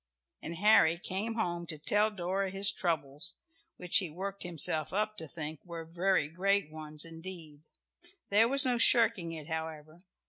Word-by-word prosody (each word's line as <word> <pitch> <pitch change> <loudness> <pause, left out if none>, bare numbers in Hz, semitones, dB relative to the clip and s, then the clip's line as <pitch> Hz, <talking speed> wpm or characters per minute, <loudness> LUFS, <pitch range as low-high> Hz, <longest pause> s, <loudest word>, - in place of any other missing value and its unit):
And 170 - -6
Harry 175 -3 +4
came 200 +5 -3
home 175 -6 -3
to 155 - -6
tell 210 +8 +2
Dora 195 -1 -3
his 195 +1 +4
troubles, 155 -7 0 0.4
which 180 -1 +3
he 185 -4 +1
worked 195 +5 -6
himself 160 -3 +1
up 215 +2 -1
to 160 - -5
think 155 -1 -7
were 170 -2 -8
very 175 -1 0
great 190 +1 0
ones 155 0 -3
indeed. 165 -3 -9 0.7
There 215 +3 +5
was 275 +3 +4
no 245 -2 +1
shirking 230 -8 +4
it 155 -2 -8
however. 160 -1 -6
175 Hz, 160 wpm, -31 LUFS, 160-200 Hz, 0.7 s, There